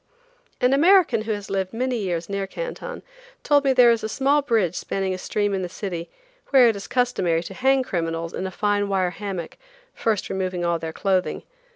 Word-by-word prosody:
An 250 Hz, +2 st, +3 dB
American 325 Hz, -, +5 dB
who 220 Hz, +1 st, -3 dB
has 205 Hz, -2 st, -4 dB
lived 190 Hz, 0 st, -2 dB
many 250 Hz, +2 st, -1 dB
years 175 Hz, -5 st, -2 dB
near 200 Hz, -1 st, -3 dB
Canton -, -, -6 dB, 0.4 s
told 290 Hz, -1 st, +3 dB
me 275 Hz, -, +3 dB
there 250 Hz, -2 st, +6 dB
is 230 Hz, -1 st, 0 dB
a 220 Hz, -, -2 dB
small 280 Hz, +5 st, +2 dB
bridge 225 Hz, -, +1 dB
spanning 190 Hz, +1 st, -2 dB
a -, -, -4 dB
stream 205 Hz, +1 st, -1 dB
in 190 Hz, -, -1 dB
the 180 Hz, -, -4 dB
city 175 Hz, -3 st, -5 dB, 0.4 s
where 260 Hz, -3 st, +7 dB
it 225 Hz, -, 0 dB
is 200 Hz, -, -7 dB
customary 190 Hz, -10 st, +1 dB
to -, -, -8 dB
hang 265 Hz, +1 st, +2 dB
criminals 165 Hz, -4 st, -3 dB
in 190 Hz, -, -3 dB
a -, -, -4 dB
fine 205 Hz, +1 st, 0 dB
wire 185 Hz, -2 st, +1 dB
hammock, 190 Hz, -4 st, -6 dB, 0.3 s
first 220 Hz, -3 st, -1 dB
removing 185 Hz, -2 st, -2 dB
all 170 Hz, -1 st, +1 dB
their 160 Hz, 0 st, -5 dB
clothing. 185 Hz, +1 st, -1 dB
200 Hz, 200 wpm, -23 LUFS, 185-250 Hz, 0.4 s, where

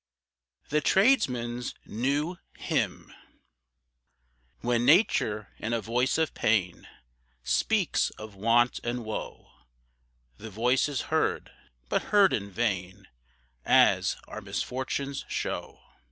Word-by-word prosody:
THE 150 Hz, +1 st, +1 dB
TRADESMAN'S 125 Hz, -, +2 dB
NEW 145 Hz, -, -1 dB, 0.2 s
HYMN. -, -, -2 dB, 1.5 s
When 120 Hz, 0 st, +1 dB
Nature 115 Hz, -, +3 dB
in 115 Hz, +2 st, -3 dB
a 115 Hz, -, +1 dB
voice 120 Hz, +4 st, 0 dB
of 160 Hz, -3 st, 0 dB
pain, 95 Hz, -5 st, 0 dB, 0.6 s
Speaks -, -, +1 dB
of 110 Hz, -1 st, -9 dB
want 115 Hz, +5 st, +2 dB
and 120 Hz, 0 st, -3 dB
woe, 110 Hz, -, -6 dB, 0.9 s
The 110 Hz, -, -9 dB
voice 125 Hz, +7 st, +1 dB
is 140 Hz, -3 st, -2 dB
heard -, -, 0 dB, 0.4 s
but -, -, -1 dB
heard 205 Hz, -2 st, +5 dB
in 100 Hz, -1 st, -2 dB
vain, 95 Hz, -2 st, -3 dB, 0.5 s
As -, -, +4 dB
our -, -, -7 dB
misfortunes 135 Hz, +2 st, -3 dB
show. -, -, -4 dB
120 Hz, 105 wpm, -28 LUFS, 105-140 Hz, 1.5 s, heard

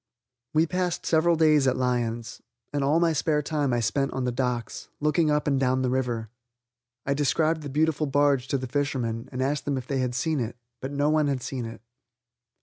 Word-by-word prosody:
We 160 Hz, +1 st, +5 dB
passed 180 Hz, 0 st, -2 dB
several 165 Hz, +1 st, +3 dB
days 155 Hz, -3 st, +4 dB
at 130 Hz, -, +2 dB
Lyons, 120 Hz, -2 st, -2 dB, 0.3 s
and 145 Hz, -1 st, 0 dB
all 145 Hz, +4 st, +3 dB
my 170 Hz, -1 st, +3 dB
spare 150 Hz, 0 st, +1 dB
time 145 Hz, -2 st, 0 dB
I 120 Hz, -, +1 dB
spent 135 Hz, +6 st, 0 dB
on 130 Hz, -, -2 dB
the 125 Hz, -, 0 dB
docks, 120 Hz, -2 st, -3 dB
looking 150 Hz, +1 st, +2 dB
up 150 Hz, 0 st, +1 dB
and 140 Hz, -2 st, +2 dB
down 130 Hz, 0 st, +1 dB
the 125 Hz, -, +1 dB
river. 120 Hz, -4 st, -2 dB, 0.7 s
I 140 Hz, -, +1 dB
described 155 Hz, +3 st, +1 dB
the 145 Hz, -, -6 dB
beautiful 155 Hz, +1 st, +1 dB
barge 140 Hz, -2 st, +2 dB
to 140 Hz, -, 0 dB
the 130 Hz, -, -4 dB
fishermen 125 Hz, -4 st, -2 dB
and 130 Hz, 0 st, -2 dB
asked 140 Hz, +2 st, -1 dB
them 140 Hz, -2 st, 0 dB
if 130 Hz, -, -5 dB
they 135 Hz, 0 st, -2 dB
had 125 Hz, -1 st, -1 dB
seen 155 Hz, +2 st, 0 dB
it, 120 Hz, -1 st, -3 dB, 0.2 s
but 130 Hz, -, -5 dB
no 145 Hz, +1 st, +1 dB
one 155 Hz, -1 st, +3 dB
had 135 Hz, -3 st, -1 dB
seen 125 Hz, -3 st, -4 dB
it. 115 Hz, -, -8 dB
140 Hz, 210 wpm, -26 LUFS, 125-150 Hz, 0.7 s, We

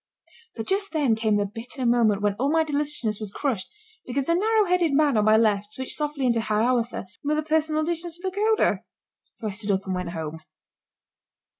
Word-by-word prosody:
But 225 Hz, -, -5 dB
just 395 Hz, -, -1 dB
then 280 Hz, -8 st, +2 dB
came 220 Hz, -1 st, +1 dB
the 205 Hz, -, +1 dB
bitter 235 Hz, +6 st, -5 dB
moment 225 Hz, -4 st, +3 dB
when 205 Hz, -1 st, +2 dB
all 275 Hz, +3 st, +1 dB
my 320 Hz, 0 st, +3 dB
deliciousness 290 Hz, -8 st, -1 dB
was 215 Hz, -2 st, -4 dB
crushed 215 Hz, -3 st, -2 dB, 0.3 s
because 260 Hz, +2 st, -2 dB
the 335 Hz, -, +2 dB
narrow 430 Hz, +4 st, +3 dB
headed 350 Hz, -4 st, +2 dB
man 290 Hz, -2 st, +3 dB
on 210 Hz, -1 st, +3 dB
my 215 Hz, 0 st, +6 dB
left 210 Hz, -2 st, +1 dB
switched 260 Hz, 0 st, -3 dB
softly 295 Hz, -3 st, -2 dB
into 235 Hz, -2 st, +2 dB
"Hiawatha" 230 Hz, +2 st, 0 dB, 0.2 s
with 300 Hz, +1 st, 0 dB
a 310 Hz, -, 0 dB
few -, -, -21 dB
personal 310 Hz, 0 st, +2 dB
additions 340 Hz, +1 st, -1 dB
to 350 Hz, -, -14 dB
the 375 Hz, -, -4 dB
coda. 435 Hz, +1 st, +2 dB, 0.5 s
So -, -, -8 dB
I -, -, -4 dB
stood 205 Hz, +1 st, -2 dB
up 195 Hz, -1 st, +1 dB
and 190 Hz, -, -2 dB
went 180 Hz, -1 st, -3 dB
home. 160 Hz, -2 st, -5 dB
250 Hz, 205 wpm, -25 LUFS, 215-310 Hz, 0.5 s, my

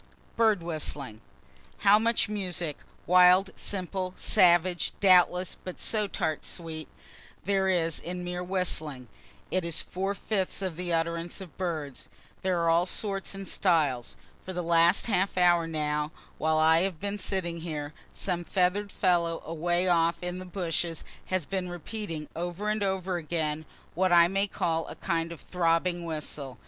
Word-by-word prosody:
BIRD 220 Hz, -6 st, +3 dB
WHISTLING 145 Hz, -8 st, -4 dB, 0.6 s
How 205 Hz, +1 st, +7 dB
much 230 Hz, +1 st, +1 dB
music 180 Hz, -7 st, -3 dB, 0.3 s
(wild, 180 Hz, +2 st, +6 dB
simple, 185 Hz, -1 st, -3 dB
savage, 175 Hz, -2 st, +4 dB
doubtless, 180 Hz, -1 st, +4 dB
but 185 Hz, -, -7 dB
so 215 Hz, -2 st, 0 dB
tart 155 Hz, -5 st, -2 dB
sweet,) 160 Hz, -2 st, -5 dB, 0.6 s
there 195 Hz, 0 st, +1 dB
is 165 Hz, -3 st, +1 dB
in 180 Hz, +1 st, -5 dB
mere 180 Hz, 0 st, -4 dB
whistling. 160 Hz, -, -2 dB, 0.4 s
It 185 Hz, -, +1 dB
is 170 Hz, -1 st, -1 dB
four 195 Hz, +2 st, -3 dB
fifths 195 Hz, -2 st, -1 dB
of 185 Hz, -4 st, -2 dB
the 175 Hz, +1 st, -4 dB
utterance 170 Hz, +1 st, -1 dB
of 185 Hz, -5 st, -10 dB
birds. 155 Hz, -7 st, -4 dB, 0.3 s
There 185 Hz, -2 st, +1 dB
are 165 Hz, -, +3 dB
all 170 Hz, +2 st, +3 dB
sorts 195 Hz, -1 st, -2 dB
and 195 Hz, -1 st, -7 dB
styles. 150 Hz, -, +1 dB, 0.3 s
For 185 Hz, -, -6 dB
the 180 Hz, 0 st, -2 dB
last 170 Hz, +2 st, +4 dB
half 195 Hz, -4 st, 0 dB
hour, 175 Hz, -2 st, +4 dB
now, 150 Hz, -1 st, -1 dB, 0.3 s
while 160 Hz, 0 st, +2 dB
I 160 Hz, +1 st, +5 dB
have 185 Hz, -4 st, -1 dB
been 205 Hz, +1 st, -3 dB
sitting 180 Hz, -4 st, -2 dB
here, 150 Hz, -3 st, -5 dB, 0.2 s
some 175 Hz, -2 st, -2 dB
feather'd 195 Hz, +3 st, +1 dB
fellow 170 Hz, -3 st, +1 dB
away 175 Hz, +3 st, 0 dB
off 170 Hz, -1 st, +3 dB
in 180 Hz, +1 st, -3 dB
the 185 Hz, -, -7 dB
bushes 170 Hz, -3 st, -2 dB, 0.2 s
has 185 Hz, -4 st, -1 dB
been 185 Hz, 0 st, -3 dB
repeating 175 Hz, -3 st, -6 dB
over 175 Hz, +5 st, -3 dB
and 215 Hz, 0 st, 0 dB
over 190 Hz, -2 st, -1 dB
again 160 Hz, -2 st, -2 dB, 0.3 s
what 185 Hz, +1 st, +1 dB
I 170 Hz, -1 st, +7 dB
may 195 Hz, +2 st, 0 dB
call 165 Hz, -4 st, -1 dB
a -, -, -8 dB
kind 165 Hz, 0 st, -1 dB
of 170 Hz, -, -8 dB
throbbing 175 Hz, +1 st, 0 dB
whistle. 150 Hz, -5 st, -5 dB
175 Hz, 155 wpm, -28 LUFS, 165-190 Hz, 0.6 s, How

